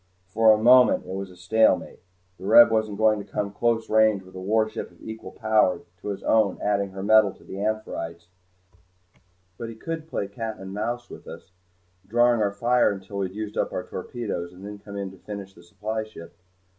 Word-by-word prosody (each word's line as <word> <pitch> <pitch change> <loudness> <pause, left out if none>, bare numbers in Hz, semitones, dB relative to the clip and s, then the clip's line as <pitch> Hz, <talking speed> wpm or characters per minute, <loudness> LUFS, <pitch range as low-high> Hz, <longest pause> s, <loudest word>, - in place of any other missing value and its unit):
For 110 +3 +4
the 110 - -5
moment 125 +1 +6
it 95 - -7
was 95 -2 -6
stalemate. 110 +5 +2 0.4
The 95 - -7
Reb 115 +2 +8
wasn't 110 -2 0
going 110 -1 +3
to 100 - -10
come 105 - -1
into 100 0 -11
close 115 -1 +1
range 110 -2 +3
with 95 - -16
a 95 - -8
warship 110 +3 0
of - - -23
equal 110 0 -8
power 110 -4 +2 0.2
to - - -8
his 100 -1 -4
own 110 -4 +2
adding 100 -1 0
her 95 0 -7
metal 110 -1 +5
to - - -20
the 95 - -8
"Amphitrite's," 85 -6 -3 1.3
but 115 - -5
he 115 - -9
could 160 +6 -6
play 100 -10 -3
cat 110 +2 -5
and 95 0 -8
mouse 120 +4 -3
with - - -12
us, - - -11 0.6
drawing 120 +1 +3
our 105 - +2
fire 120 +4 +2
until 100 0 -6
we 95 - 0
had 95 - -14
used 105 -1 -4
up - - 0
our - - -3
torpedoes, 100 -7 -5
and 95 +2 -12
then 105 0 -8
come 100 0 -9
in 100 -1 -4
to 95 - -15
finish 100 0 -8
the 85 - -17
supply 110 +5 -4
ship. 85 -6 -12
105 Hz, 205 wpm, -25 LUFS, 95-110 Hz, 1.3 s, Reb